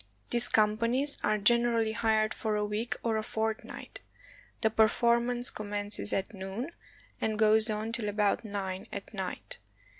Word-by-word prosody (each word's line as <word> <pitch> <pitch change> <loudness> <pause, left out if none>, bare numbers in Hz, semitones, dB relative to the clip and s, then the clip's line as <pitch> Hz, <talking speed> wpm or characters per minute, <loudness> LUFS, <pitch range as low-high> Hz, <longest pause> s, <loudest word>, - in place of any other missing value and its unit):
These 240 0 +3
companies 230 +6 +2
are 215 0 +2
generally 230 +1 +3
hired 220 -1 +1
for 215 -1 -2
a 210 0 0
week 210 +3 -2
or 225 -2 +1
a 215 - -2
fortnight. 220 0 -4 0.6
The 220 - +2
performance 235 +3 +2
commences 205 0 0
at 195 +3 -2
noon, 195 - -5 0.5
and 220 -1 0
goes 220 +1 +5
on 215 +1 -2
till 230 -3 -1
about 205 +1 +1
nine 195 -3 -4
at - - -7
night. - - -6
220 Hz, 145 wpm, -30 LUFS, 210-235 Hz, 0.6 s, goes